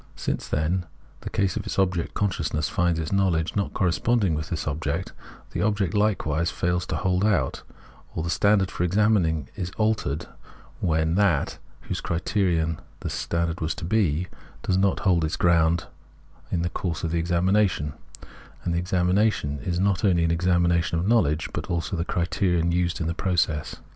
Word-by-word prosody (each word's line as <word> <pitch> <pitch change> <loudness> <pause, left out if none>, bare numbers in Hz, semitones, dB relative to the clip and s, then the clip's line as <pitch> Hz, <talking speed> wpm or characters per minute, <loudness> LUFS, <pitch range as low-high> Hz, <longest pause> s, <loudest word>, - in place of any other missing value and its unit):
Since, - - -3
then, 80 +2 0
in 90 -1 -1 0.3
the - - -6
case 95 -2 0
of - - -2
its - - -5
object 90 -3 0
consciousness 75 -7 0
finds 85 -2 +1
its 80 -1 -3
knowledge 95 -4 +1
not 100 -1 -1
corresponding 95 +1 +2
with 75 0 -3
this 80 -4 -3
object, 80 +4 -2 0.4
the - - -2
object 105 -4 +1
hkewise 90 -6 +1
fails 90 0 -1
to - - -2
hold 95 0 +1
out; 105 -2 +1 0.5
or 80 - -2
the 85 - -2
standard 100 -1 +3
for - - -2
examining 90 -6 +2
is 90 -3 -3
altered 110 -10 0 0.5
when 80 -1 +1
that, 95 -9 +2 0.2
whose - - -4
criterion 85 -2 0 0.2
this - - -3
standard 85 0 -1
was 80 0 -1
to - - -6
be, 90 -4 +1 0.4
does 95 - +1
not 95 0 +2
hold 90 -4 +3
its 80 - 0
ground 85 -1 +3 0.7
in 85 - 0
the 85 - 0
course 85 -3 -3
of 85 - -1
the 85 - +1
examination; 85 -2 +1 0.7
and 85 - -1
the 85 - +1
examination 90 -4 +1
is 85 +7 -2
not 100 0 +1
only 90 -5 +3
an 85 - +2
examination 85 -1 +2
of 85 +3 -1
knowledge, 80 -10 +2
but - - -4
also 85 -1 -2
of 90 - -2
the 85 - -1
criterion 85 -1 +1
used 85 0 0
in 80 - -1
the 85 - -1
process. 85 -5 0
85 Hz, 175 wpm, -25 LUFS, 80-95 Hz, 0.7 s, standard